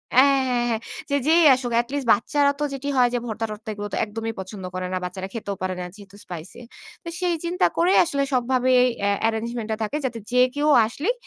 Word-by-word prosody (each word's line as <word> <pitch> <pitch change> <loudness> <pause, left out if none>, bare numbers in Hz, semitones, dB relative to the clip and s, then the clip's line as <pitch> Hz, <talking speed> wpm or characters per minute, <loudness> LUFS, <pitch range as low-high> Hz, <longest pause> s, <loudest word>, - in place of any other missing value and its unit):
অ্যাঁ, 275 +1 +6
হ্যাঁ, 240 -1 +1
হ্যাঁ। 225 -1 -1 0.3
যে, 285 - +1
যেই 330 +2 +5
আসুক, 250 -2 -4
at 240 - -14
least 280 -4 -2
বাচ্চারা 280 +7 +2
তো - - -1
যেটি 275 +1 -5
হয় 245 -1 +5
যে, 245 - +1
ভর্তা-টর্তা 220 -1 -5
এগুলো 205 0 -5
তো - - -1
একদমই 225 +1 -5
পছন্দ 190 0 -7
করে 185 0 -3
না। - - 0
বাচ্চারা 185 +1 -5
খেতেও 205 -3 -4
পারে 185 0 -1
না, 180 - -4
যেহেতু 200 -1 -14
spicy 175 +6 -9 0.4
তো - - -11
সেই 350 -2 +1
চিন্তা 360 +2 +1
করেই 355 +3 +4
আসলে 280 -4 -1
সবভাবে 255 0 +2 0.4
আ - - +3 0.2
arrangement 225 0 -3
টা - - +1
থাকে, 215 +8 -2
যাতে 240 -3 -3
যে 250 - +3 0.2
কেউ 295 +1 0 0.2
আসলেই 305 - -2
235 Hz, 215 wpm, -23 LUFS, 210-280 Hz, 0.4 s, অ্যাঁ